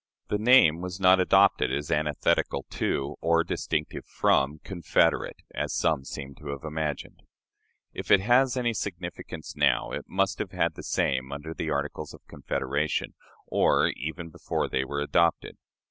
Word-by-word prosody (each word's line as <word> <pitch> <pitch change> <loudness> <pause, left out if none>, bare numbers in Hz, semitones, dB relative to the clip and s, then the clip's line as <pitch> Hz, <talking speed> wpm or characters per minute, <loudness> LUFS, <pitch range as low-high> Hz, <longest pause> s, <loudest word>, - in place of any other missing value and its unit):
The 105 - 0
name 110 -9 +5
was 90 +1 -5
not 95 0 +5
adopted 95 -5 +4
as 70 +2 -3
antithetical 75 -1 0
to, 70 0 -2
or 85 0 +3
distinctive 75 -2 -3
from, 70 +3 +1
"confederate," 85 -4 0
as - - -2
some 75 -5 +1
seem 70 0 -7
to 75 - -10
have 70 -1 -5
imagined. 75 -2 -4 0.7
If - - -7
it 100 - +7
has 125 +5 +3
any 120 -2 0
significance 85 -5 -6
now, - - +2
it - - -5
must 95 0 0
have - - -4
had - - +1
the - - -9
same 65 0 -1
under 75 +3 -6
the 80 - -4
Articles 70 0 -3
of - - -20
Confederation, 70 +3 -2 0.3
or - - +3
even 80 +3 -6
before - - -2
they 65 - -1
were 70 +2 -3
adopted. 85 +3 +1
80 Hz, 155 wpm, -27 LUFS, 70-95 Hz, 0.7 s, it